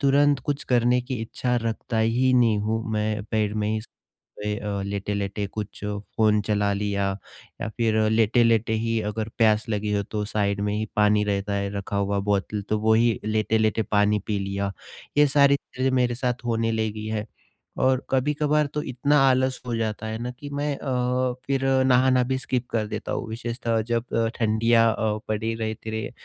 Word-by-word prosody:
तुरंत 140 0 +3
कुछ 145 - -3
करने 125 0 +3
की 125 -1 -5
इच्छा 125 +2 -2
रखता 115 +1 -2
ही 120 +4 +2
नहीं 115 -4 +4
हूँ, 110 +1 -1
मैं 105 0 -1
बेड 105 -1 +1
में 105 -1 0
ही 110 0 0
स - - -12 0.6
ते 105 0 -1
अ, 100 -1 -3
लेटे-लेटे 100 0 -2
कुछ 105 +1 -7
फ़ोन 105 +1 +1
चला 105 -1 +2
लिया, 100 -1 -1 0.5
या - - -2
फिर 115 -2 +1 0.2
लेट-लेटे 115 0 +3
ही 115 -1 0
अगर 110 +1 -3
प्यास 110 -1 +4
लगी 105 -1 -1
हो 100 0 +1
तो 105 -1 -2
साइड 100 -1 -1
में 105 - 0
ही 110 +1 -1
पानी 105 0 +4
रहता 100 0 -1
है, 100 0 -1
रखा 100 +1 -4
हुआ 100 0 0
बोतल, 100 +1 0
तो 110 - +1
वोही 110 +1 +3
लेट-लेटे 110 0 +1
पानी 105 0 +2
पी 105 -2 -1
लिया, 100 0 -2 0.4
ये 145 0 +6
सारी 140 0 +5
चीज़ें 130 -1 -3
मेरे 120 -1 +1
साथ 125 +1 -2
होने 115 -1 0
लगी 110 -1 -2
है। 110 -1 -2 0.6
और 130 -1 +3
कभी-कभार 150 +3 +2
तो 150 - -1
इतना 140 +3 +1
आलस 130 0 +1
हो 120 - -2
जाता 110 -1 -2
है 110 0 -4
ना 120 +1 -4
कि 145 - -7
मैं 145 +1 -1
अ, 125 -1 0
फिर 135 -1 0 0.2
नहाना 130 0 +4
भी 130 - +1
स्किप 125 -1 -2
कर 110 -2 0
देता - - -4
हूँ, - - -3
विशेषतः 115 0 -2
जब 115 +1 -1
अ, 115 0 +2
ठंडियाँ 115 +1 +3
अ, 110 -1 0
पड़ी 110 +1 -1
रहती 110 0 -4
रही 110 -1 -3
110 Hz, 185 wpm, -25 LUFS, 105-125 Hz, 0.6 s, ये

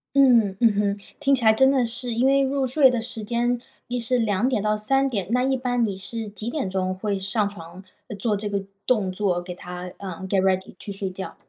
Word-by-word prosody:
嗯， 235 -8 +5
嗯 225 -3 +5
哼， 200 0 0 0.2
听 275 -2 +3
起 245 - -2
来 220 - +7
真 265 +4 +5
的 260 -3 +2
是 240 +1 -2
因 240 +3 +1
为 275 +1 +4
入 270 0 +1
睡 265 +1 +5
的 245 -2 -1
时 225 -2 -6
间， 240 +2 0 0.3
你 245 0 -2
是 245 +2 +1
2：00-3：00， 215 +1 +1
那 250 +1 +2
一 265 0 +2
般 245 -2 0
你 200 -3 -3
是 220 +3 -5
几 215 +3 -5
点 255 -9 -2
钟 185 0 -1
会 200 0 -2
上 200 +2 0
床， 175 -1 -11 0.2
呃， 205 - -6
做 210 +1 0
这 205 +1 -3
个 200 -1 -2 0.2
动 210 -7 +1
作 185 -2 0
给 180 0 -7
它， 180 0 -8
嗯， 190 -1 -7
Get 190 -1 +2
ready 190 0 0
去 205 - -7
睡 195 -1 -4
觉？ 190 +1 -7
215 Hz, 255 characters per minute, -24 LUFS, 195-245 Hz, 0.3 s, 来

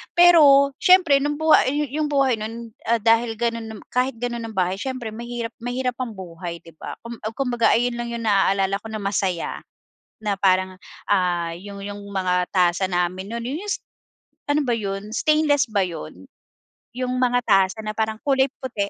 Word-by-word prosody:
Pero, 295 -6 +7
siyempre 360 -7 +5
nung 295 +1 -2
buha 315 -4 +5
yu 295 +1 -1
yung 305 - +1
buhay 270 -3 +3
nun 225 +1 -7 0.2
ah, 230 0 +3
dahil 225 +1 +2
ganun 230 -1 -1
nam 220 -1 -8
kahit 250 +1 0
ganun 240 -1 -3
ang 225 -1 -7
bahay 185 0 +1
siyempre 255 0 -4
mahirap 235 +1 -6
mahirap 245 +1 -2
ang 240 - -6
buhay, 175 -2 -7
'di 165 -1 -17
ba? - - -7
Kum 235 0 -7 0.2
kumbaga 245 -4 +2
ayun 245 +1 +2
lang 240 0 -4
yung 230 -1 -4
naaalala 195 -1 +2
ko 220 - -10
na 215 - -4
masaya, 195 -3 -2 0.6
na 205 -2 -1
parang, 185 -1 +2 0.3
ah, 180 -4 +1
yung 200 +2 -9
yung 205 +1 -7
mga 180 -2 +1
tasa 180 0 +3
namin 180 +1 -1
noon 235 +1 -4
iyong 265 +5 -3
iyong - - -5
s - - -2 0.7
ano 290 +1 +3
ba 245 - +1
iyon? 195 -3 -4
Stainless 300 0 +3
ba 205 -2 +1
iyon? 95 - -8 0.7
Iyong 255 0 -2
mga 245 -1 +3
tasa 195 0 +3
na 215 - -3
parang 220 -1 -1
kulay 270 -1 +3
puti? 215 -6 -3
225 Hz, 180 wpm, -22 LUFS, 195-255 Hz, 0.7 s, Pero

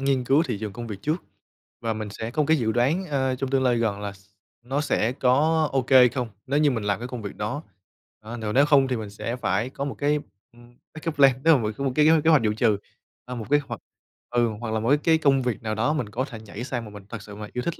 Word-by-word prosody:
nghiên 135 -2 +1
cứu 140 +5 +4
thị 125 -10 -3
trường 105 -2 -4
công 120 +2 -7
việc 105 -3 -7
trước 155 +2 +1 0.7
và 115 -1 -1
mình 110 -1 -5
sẽ 110 +2 -6
có 150 - +1
một - - +1
cái 160 0 +4
dự 115 -5 0
đoán, 135 - +1
ờ, 130 -5 0
trong 135 +1 -3
tương 135 -1 +1
lai 125 -2 +3
gần 110 -3 0
là 100 -1 -4
s 100 +1 -20 0.3
nó 135 +4 -2
sẽ 125 -5 +1
có 155 +5 +3
ô 135 - +2
kê 130 +1 +5
hay 125 -1 +7
không 125 -1 -3 0.2
nếu 140 +2 +1
như 150 -2 +4
mình 115 -4 -2
làm 100 0 0
cái 120 - -5
công 125 -2 -6
việc 100 - -7
đó. 125 +9 -4 0.6
Ờ, 110 +2 -8 0.2
nếu 140 +3 +5
không 140 -3 +4
thì 130 - -1
mình 110 -2 -6
sẽ 115 +3 -4
phải 115 -1 -1
có 135 - -5
một 140 - -4
cái, 150 +1 +1 0.3
ừm, 120 0 -19 0.2
backup 155 0 -4
plan 135 -3 +6
tức 165 - +6
là 155 - +6
mình 110 -3 -2
có 140 - -3
một 135 - +1
cái 150 - +4
cái 160 -1 +5
kế 160 - +4
hoạch 155 -5 +6
dụ 105 -1 +1
trừ, 110 -2 +2 0.5
à, 125 - -6
một 115 -3 -5
cái 145 +1 +5
hoặc - - -6 0.5
ừ, 120 -1 +2
hoặc 115 -2 -4
là 110 - +1
một 115 +3 -1
cái 145 - +5
cái 160 +2 +3
công 140 -4 +3
việc 125 -2 -2
nào 110 -1 -2
đó 135 +8 +1
mình 125 -9 -2
có 120 +6 -2
thể 120 -5 -9
nhảy 110 +1 -8
sang 125 -3 -4
mà 105 - -10
mình 105 -1 -11
thật 110 -2 -6
sự 105 0 -11
mà 105 0 -7
yêu 125 - -2
thích 170 +4 -3
125 Hz, 295 wpm, -25 LUFS, 110-140 Hz, 0.7 s, hay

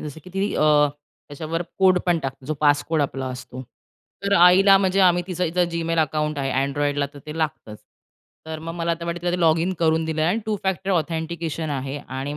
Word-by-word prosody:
जसं 150 +1 -8
की 185 - -12
ती 195 +2 -1
अ, - - -1 0.7
त्याच्यावर 160 +3 -4 0.2
कोड 185 -1 +5
पण 175 -2 +3
टाकतो 135 -2 -6
जो 155 - -1
पासकोड 150 +2 +2
आपला 135 -1 -3
असतो. 130 0 -7 0.6
तर 200 - 0
आईला 185 +3 +7
म्हणजे 195 0 +1
आम्ही 180 -1 +4
तिचं 180 -1 0
Gmail 165 0 -1
अकाउंट 150 -1 -1
आहे. 135 -1 -1 0.2
Androidला 145 0 -1
तर - - -10
ते 150 +1 -6
लागतंच. 150 -8 -3 0.7
तर 160 0 -5
मग 165 +1 -6
मला 170 -1 -2
आता 170 0 -3
वाटेल 170 0 -4
तिला 175 - 0
ते 180 - -1
लॉगिन 165 +2 +3
करून 160 -1 +2
दिलेलंय 160 0 -1
आणि 195 +6 +1
टु 215 -1 0
फॅक्टर 190 0 -1
ऑथेंटिकेशन 165 -2 -2
आहे 135 0 -3
आणि 135 +2 -4
अ, 150 - -6
160 Hz, 200 wpm, -23 LUFS, 145-175 Hz, 0.7 s, आईला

